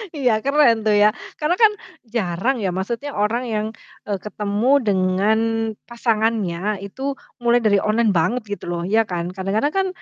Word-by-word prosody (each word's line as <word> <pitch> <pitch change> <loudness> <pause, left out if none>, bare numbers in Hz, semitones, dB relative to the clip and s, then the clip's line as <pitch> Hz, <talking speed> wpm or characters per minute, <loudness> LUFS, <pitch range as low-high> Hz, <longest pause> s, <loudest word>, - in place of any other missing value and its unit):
Iya, 250 -6 +2
keren 275 -5 +3
tuh 215 - +3
ya. 205 +1 +6 0.3
Karena 310 +4 +1
kan 440 -2 +6 0.3
jarang 225 +1 -1
ya, 195 - 0
maksudnya 235 +9 -4
orang 215 +4 0
yang, 215 -1 -1 0.4
eee, 200 -2 -2
ketemu 210 +3 -1
dengan 195 +1 +2 0.5
pasangannya 215 -5 0
itu 270 +8 -4 0.3
mulai 240 0 +4
dari 205 -2 +4
online 215 +1 +2
banget 215 +9 +1
gitu 205 -1 -6
loh, 170 -1 -2
iya 220 +4 +3
kan. 175 -1 -3
Kadang-kadang 200 +10 -1
kan, 385 0 +1
215 Hz, 155 wpm, -21 LUFS, 200-240 Hz, 0.5 s, ya